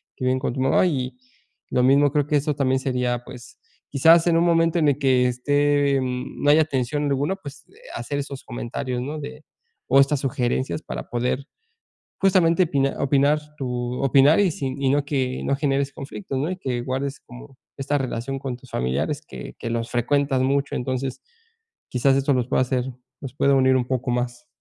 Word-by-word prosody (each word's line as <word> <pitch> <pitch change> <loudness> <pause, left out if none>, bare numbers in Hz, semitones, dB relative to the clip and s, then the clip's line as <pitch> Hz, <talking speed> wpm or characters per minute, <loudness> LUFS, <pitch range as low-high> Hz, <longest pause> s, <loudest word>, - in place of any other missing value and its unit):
que 130 - -4
viven 130 0 +2
con 125 - -2
tu 130 - -5
mamá, 135 +7 +3
y 130 -6 -2 0.5
lo 125 - +1
mismo 140 +2 +4
creo 145 -2 +1
que 150 - +1
eso 150 +2 0
también 130 -2 +1
sería, 125 -2 -1
pues 125 -2 -12 0.3
quizás 165 +5 +5
en 170 - +3
un 170 - +3
momento 165 0 +3
en 150 -2 +4
el 140 0 0
que 130 -2 +3
esté 145 +2 +2
no 125 +3 -2
haya 155 +1 +5
tensión 145 +1 -1
alguna, 145 +6 0
pues 145 -6 -11 0.3
hacer 145 -1 -3
esos 140 -1 -6
comentarios, 125 +1 -4
¿no?, 150 +4 -5
de 150 +1 -9 0.4
o 135 +2 +5
estas 140 +1 +3
sugerencias 130 +2 -1
para - - -7
poder 125 +3 -2 0.7
justamente 185 -2 +4
opinar 140 -4 0
opinar 140 +2 +3 0.2
tu 125 -1 -3
opinar 135 +5 +5
y 195 -3 +3
sin 135 -3 -4
y 135 - +2
no 145 +1 +2
que 130 -3 -2
no 140 - +1
generes 140 -1 0
conflicto, 140 +2 -7
¿no?, 150 +6 -1
y 185 - -3
que 130 -8 -3
guardes 135 +2 -3
como 125 +2 -14 0.2
esta 145 +1 -1
relación 135 +1 -3
con 130 -2 -5
tus 125 +1 -18
familiares 70 - -2
que - - -9
que 115 - -5
los 115 0 -2
frecuentas 135 +2 +1
mucho, 140 +2 0
entonces 130 +1 -3 0.7
quizás 135 +2 +2
esto 135 0 +2
los 125 -1 -1
pueda - - +2
hacer 125 -1 -1 0.4
los 135 -2 -8
pueda 140 0 +3
unir 130 -1 +4
un 125 -1 0
poco 130 -1 -1
más. 120 0 -3
135 Hz, 190 wpm, -23 LUFS, 125-145 Hz, 0.7 s, quizás